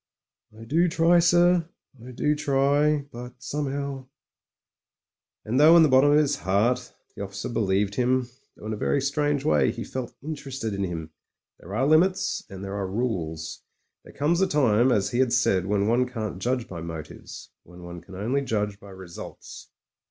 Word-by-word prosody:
*T 110 +1 -12
do 165 +9 +2
try, 170 +1 +4
sir 175 0 +3 0.2
— 120 -4 -21
I 125 - -10
do 150 +4 0
try; 145 +1 +1
but 120 +1 -8
some'ow 140 0 -4 0.7
" - - -65
And 120 +5 0
though 160 +3 +8
in 165 - +7
the 155 - +4
bottom 130 +2 +5
of - - +5
his 145 -2 +2
heart 120 +7 0 0.2
the - - -8
officer 100 0 -6
believed 100 -3 0
him, 125 +2 +1 0.3
though - - -12
in 110 - -3
a - - -4
very 140 - +1
strange 145 +1 0
way - - +3
he 115 - -6
felt 130 -2 -6
interested 135 -7 -5
in 100 0 -2
him, 80 -3 -6 0.5
there 95 +4 -8
are 130 +4 +1
limits 170 +6 +2
and 95 0 -9
there 100 0 -5
are 100 -2 -2
rules. 95 -7 -3 0.4
There - - -14
comes 165 +6 0
a 190 - +3
time, 130 - +3
as 105 -5 +1
he 120 - -1
had 130 -2 +2
said, 95 -8 +2
when 100 0 +1
one 125 +2 +2
can't 110 -6 -5
judge 125 -1 -1
by 85 -3 -7
motives, 80 -2 -9
when 90 +1 -15
one 85 -1 -9
can 95 - -13
only 120 +9 -1
judge 105 -5 -2
by 100 - -13
results. 95 -3 -10
125 Hz, 185 wpm, -25 LUFS, 100-145 Hz, 0.7 s, though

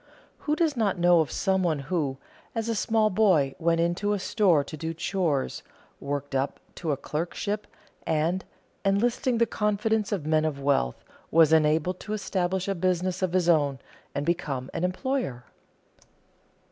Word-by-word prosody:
Who 300 - +3
does 320 -3 +1
not 210 -5 +1
know 175 0 +5
of 155 -4 +1
some 190 0 +1
one 170 -4 +1
who, 140 -1 -2 0.4
as 225 0 -1
a 230 - +1
small 220 0 +2
boy, 180 -10 +3
went 165 0 +2
into 175 +5 +1
a - - +1
store 190 -6 +3
to 155 - -8
do 160 +2 -4
chores, 165 -6 -1 0.4
worked 140 0 -4
up 135 +1 -1 0.2
to 165 -3 -2
a 140 - 0
clerkship 180 +8 -3 0.4
and, 165 +4 0 0.4
enlisting 235 +5 +1
the 235 - +4
confidence 210 -1 0
of 190 -8 -2
men 155 0 +2
of 155 -3 -2
wealth, 135 - 0 0.3
was 160 -1 +5
enabled 160 +3 +3
to 210 - -5
establish 190 -2 -1
a 200 - +1
business 185 0 0
of 185 -2 0
his 185 -2 +2
own 145 -5 +3 0.4
and 140 - -1
become 145 -6 -2
an - - -3
employer? 185 - -2
175 Hz, 160 wpm, -27 LUFS, 155-205 Hz, 0.4 s, know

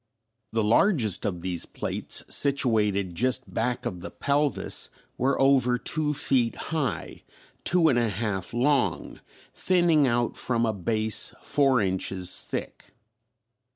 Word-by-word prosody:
The 110 -1 0
largest 115 - +2
of 90 -4 -3
these 90 -1 -2
plates - - -3
situated 110 -9 +2
just 130 +6 0
back 125 +2 -2
of 90 -7 -4
the 100 - -6
pelvis 145 0 0 0.3
were 135 +2 0
over 135 -2 +3
two 150 +3 -1
feet 125 -4 +1 0.2
high, 150 -5 -3 0.4
two 175 -2 +3
and 125 -6 +3
a 115 -2 +1
half 100 -3 -3
long, 130 +3 0 0.3
thinning 175 -6 +2
out 120 -1 0
from 120 -2 -1
a 110 - 0
base 110 +3 -1
four 135 -4 +2
inches 95 -1 0
thick. - - -7
120 Hz, 125 wpm, -26 LUFS, 105-140 Hz, 0.4 s, over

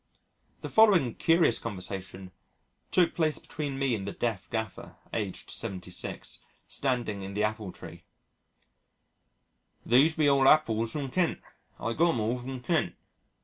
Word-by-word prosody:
The - - -5
following 190 - +5
curious 165 -7 +3
conversation 95 -2 -6 0.6
took 180 -2 +3
place 155 -3 +1
between 145 -3 -5
me 135 -2 +1
and 100 -3 -3
the - - -2
deaf 110 -5 -3
gaffer, 110 -2 -4 0.2
aged 105 -5 -4
76, 90 -1 -5 0.3
standing 120 -7 -1
in 95 +1 -7
the 105 - +1
apple 105 -2 -2
tree, - - -12 1.8
"These 140 +7 +5
be 155 -2 +3
all 140 -1 +5
appulls 115 -7 +4
from 140 -4 -3
Kent 180 +1 +1 0.4
I 115 - -2
got 170 +3 +3
'em - - -1
all 115 +4 0
from 130 +1 -6
Kent." 125 - 0
120 Hz, 140 wpm, -29 LUFS, 105-145 Hz, 1.8 s, following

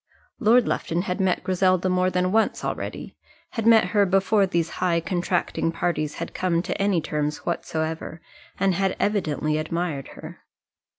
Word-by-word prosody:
Lord 240 0 +4
Lufton 170 +2 -1
had 185 +1 -2
met 185 -2 +1
Griselda 185 0 +2
more 185 0 +2
than 185 0 0
once 225 +1 +1
already; - - -5 0.4
had 225 -2 -2
met 220 -5 +6
her 205 +1 +3
before 195 +1 +3
these 170 -3 0
high 175 -2 +2
contracting 175 -1 -1
parties 160 -3 -2
had 170 - -6
come 175 -2 0
to - - -3
any 200 -3 +2
terms 150 -1 -3
whatsoever, 160 -1 -3 0.4
and 195 0 +2
had 195 +1 0
evidently 155 -7 0
admired 160 -3 -3
her. - - -10
180 Hz, 155 wpm, -24 LUFS, 165-195 Hz, 0.4 s, met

